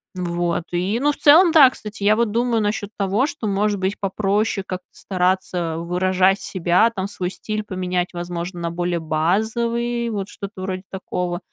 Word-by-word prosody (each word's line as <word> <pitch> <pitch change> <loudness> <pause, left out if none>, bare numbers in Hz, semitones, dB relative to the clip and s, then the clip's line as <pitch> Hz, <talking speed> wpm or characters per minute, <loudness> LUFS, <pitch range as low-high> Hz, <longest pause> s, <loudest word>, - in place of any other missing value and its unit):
Вот. 175 -1 -1
И, 185 +6 0
ну, 295 +2 +3
в - - -8
целом, 330 +4 +7
да, 300 -5 +9
кстати, 210 -3 -8
я 210 +1 +5
вот 235 0 +1
думаю 235 0 +1
насчет 205 -1 -2
того, 200 +5 +1
что, 225 -7 -5
может 205 0 0
быть, 190 +2 -2
попроще 200 +1 0
как-то 185 0 -6
стараться 180 -3 -1
выражать 185 +3 +2
себя, 185 +4 +2
там, 190 -1 -2
свой 185 -3 -4
стиль 215 +1 -4
поменять, 185 -2 -2
возможно, 175 +1 -5
на 170 0 -2
более 175 0 -1
базовый, 230 +9 0
вот 200 -2 -3
что-то 200 -1 -8
вроде 185 0 -4
такого. 180 -2 -3
190 Hz, 165 wpm, -21 LUFS, 180-215 Hz, -, да